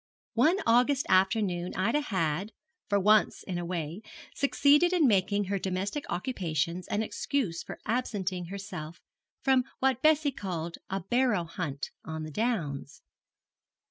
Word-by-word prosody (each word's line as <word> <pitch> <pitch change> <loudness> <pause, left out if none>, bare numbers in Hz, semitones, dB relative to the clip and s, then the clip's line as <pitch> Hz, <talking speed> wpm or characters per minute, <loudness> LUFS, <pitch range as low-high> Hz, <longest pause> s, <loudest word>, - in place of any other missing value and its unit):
One 310 +11 +4
August 250 +4 +3
afternoon 185 -2 +2
Ida 230 +10 +1
had, 190 - -1 0.4
for 200 -1 +3
once 210 +2 +3
in 180 -2 -3
a 175 - -4
way, 170 +1 -4 0.3
succeeded 290 +5 +4
in 330 -6 +4
making 200 -1 +2
her 200 0 -2
domestic 195 +9 -2
occupations 175 - -2
an 210 +1 0
excuse 210 -3 -2
for - - -8
absenting 200 -7 -1
herself 180 -4 -7 0.4
from 265 -1 +4
what 260 -2 +1
Bessie 310 -1 +4
called 175 -8 -5
a 195 0 -2
'barrow 240 -1 +2
hunt' 160 -5 -5
on 160 0 -5
the 155 - -6
downs. 165 - -2
200 Hz, 135 wpm, -29 LUFS, 175-245 Hz, 0.4 s, One